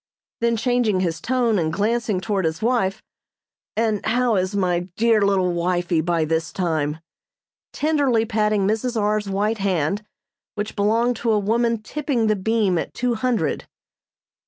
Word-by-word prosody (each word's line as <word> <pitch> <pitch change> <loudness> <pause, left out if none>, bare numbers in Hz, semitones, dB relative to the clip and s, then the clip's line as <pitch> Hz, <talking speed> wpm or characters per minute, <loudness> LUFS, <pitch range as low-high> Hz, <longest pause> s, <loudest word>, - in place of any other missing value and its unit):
Then 235 0 +1
changing 235 -5 +1
his 170 -3 -2
tone 240 -4 +1
and 160 -2 0
glancing 215 +1 0
toward 195 0 -1
his 160 0 -1
wife: 225 -5 0 0.7
"And 220 -2 0
how 240 0 +1
is 185 +1 0
my 180 -2 0
dear 225 -1 +3
little 190 -3 +2
wifey 175 -1 0
by 165 -1 0
this 165 +2 -1
time?" 160 -5 -1 0.7
tenderly 285 -7 +1
patting 210 -2 +1
Mrs. 225 +3 0
R.'s 210 -1 0
white 210 +3 0
hand, 195 0 0 0.5
which 210 0 -4
belonged 225 +4 +1
to 230 0 0
a 215 - +3
woman 230 +2 0
tipping 275 -2 -1
the 215 -1 +2
beam 200 -3 +1
at - - -6
two 245 -1 0
hundred. 225 - -1
210 Hz, 150 wpm, -22 LUFS, 185-230 Hz, 0.7 s, dear